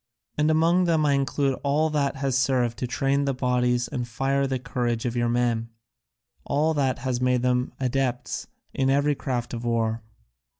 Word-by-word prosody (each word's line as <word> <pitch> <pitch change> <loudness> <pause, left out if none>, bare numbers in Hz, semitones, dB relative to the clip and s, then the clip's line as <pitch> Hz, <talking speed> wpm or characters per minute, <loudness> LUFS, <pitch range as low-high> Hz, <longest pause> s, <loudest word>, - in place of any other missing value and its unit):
And 150 +1 +2
among 165 +3 +3
them 160 -3 +2
I 145 - +3
include 140 0 0
all 150 +3 +1
that 145 -2 0
has 135 -2 -1
served 125 -3 +1
to 125 - -2
train 140 +3 0
the 135 -1 0
bodies 125 -1 +1
and 125 -2 -4
fire 135 +4 0
the 130 -1 -1
courage 120 -2 -2
of 120 0 -2
your 120 -1 +1
men, 120 -1 0 0.7
all 155 +3 +1
that 135 -4 0
has 125 0 -2
made 125 -1 +2
them 125 0 +1
adepts 130 -1 -2 0.3
in 135 0 +1
every 145 +2 +3
craft 125 -4 -3
of 120 0 -4
war. 115 -1 0
130 Hz, 175 wpm, -25 LUFS, 120-140 Hz, 0.7 s, among